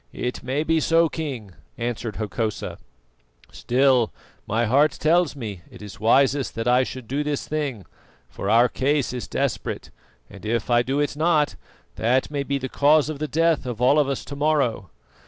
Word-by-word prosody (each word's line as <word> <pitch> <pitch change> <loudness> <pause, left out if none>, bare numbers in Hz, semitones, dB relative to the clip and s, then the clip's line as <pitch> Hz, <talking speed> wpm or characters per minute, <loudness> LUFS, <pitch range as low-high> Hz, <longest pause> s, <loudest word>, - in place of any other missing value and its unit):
"It 125 - -4
may 135 +4 -1
be 160 0 +2
so, 165 +1 +3
King," 135 - -5 0.3
answered 115 -2 -3
Hokosa; 110 0 -3 0.7
"still, 125 -2 +2 0.4
my 115 +3 +1
heart 140 +6 +3
tells 165 0 +2
me 105 -9 -6
it - - -13
is 105 - -10
wisest 135 +4 +2
that 115 +1 -3
I 125 +1 +5
should 130 -2 -5
do 140 +5 -1
this 150 -1 -3
thing, 140 - -3 0.4
for 100 - -5
our 115 +3 +5
case 140 +1 0
is 120 -6 -5
desperate, - - -3 0.4
and 100 -3 -13
if 115 +1 -1
I 120 0 +5
do 135 +4 -1
it 145 -1 0
not, 155 -1 +2 0.4
that 125 +5 +1
may 145 -1 -1
be 140 0 -1
the 130 -1 -4
cause 150 +2 +3
of 155 -3 -5
the 155 - -2
death 165 -3 +1
of 120 -3 -4
all 130 +5 +4
of 145 -2 +2
us 135 - -3
to 140 - -7
morrow. 140 - 0
130 Hz, 180 wpm, -23 LUFS, 115-150 Hz, 0.7 s, I